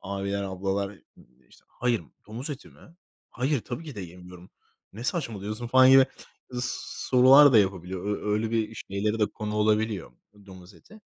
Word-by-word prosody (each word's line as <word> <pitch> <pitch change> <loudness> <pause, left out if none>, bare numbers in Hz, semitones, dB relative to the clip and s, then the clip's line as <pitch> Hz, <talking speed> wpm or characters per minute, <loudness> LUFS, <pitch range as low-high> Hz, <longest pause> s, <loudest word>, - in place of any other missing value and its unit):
abiler, 100 0 -3
ablalar, 95 +1 -2 0.3
eee, - - -18 0.2
işte, - - -22
"Hayır, 120 -5 -1 0.2
domuz 120 +8 -6
eti 140 -2 -8
mi? - - -21 0.5
Hayır, 130 +1 -1
tabii 130 +9 -7
ki 150 - -8
de - - -5
yemiyorum. 90 0 -12 0.4
Ne 115 +4 -9
saçmalıyorsun?" 110 - -3
falan 130 +2 +6
gibi 135 0 +7 0.5
sorular 130 +3 +4
da 115 - +7
yapabiliyor. 95 -2 -1
Ö 105 0 -2
öyle 110 +1 -1
bir 110 -1 -1 0.2
şeylere 105 +3 -1
de 105 - +3
konu 105 0 -6
olabiliyor 105 - 0 0.3
domuz 95 0 -13
eti. 215 - -18
105 Hz, 155 wpm, -26 LUFS, 100-125 Hz, 0.5 s, gibi